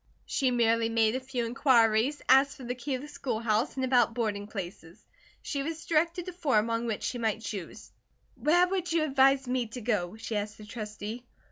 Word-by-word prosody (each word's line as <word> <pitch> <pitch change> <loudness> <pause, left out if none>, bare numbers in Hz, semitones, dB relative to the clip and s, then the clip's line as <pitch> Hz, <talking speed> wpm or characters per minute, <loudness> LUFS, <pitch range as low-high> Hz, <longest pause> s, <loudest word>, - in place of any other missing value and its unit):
She 265 - +1
merely 230 -2 +2
made 225 0 +2
a - - 0
few 255 -2 -3
inquiries, 235 +1 +3
asked 270 +2 +5
for 265 - -10
the 245 0 -3
key 260 +2 -3
of 255 - -6
the - - -8
schoolhouse, 230 -3 -1
and 260 -1 -1
about 245 -3 +3
boarding 210 -4 -2
places. 175 -5 -8 0.4
She 280 - -2
was 320 +3 -5
directed 335 +2 +1
to 365 - -6
four 305 -10 +1
among 230 +2 0
which 220 -3 -3
she 245 - -2
might 220 -1 -1
choose. 205 -5 -7 0.4
"Where 350 +4 +3
would 365 -2 -2
you 330 -1 +2
advise 270 -2 +3
me 250 -1 0
to 245 +3 -8
go?" 210 -4 -1
she 225 0 -5
asked 210 0 -4
the 215 - -11
Trustee. 215 +1 -6
240 Hz, 200 wpm, -29 LUFS, 220-275 Hz, 0.4 s, asked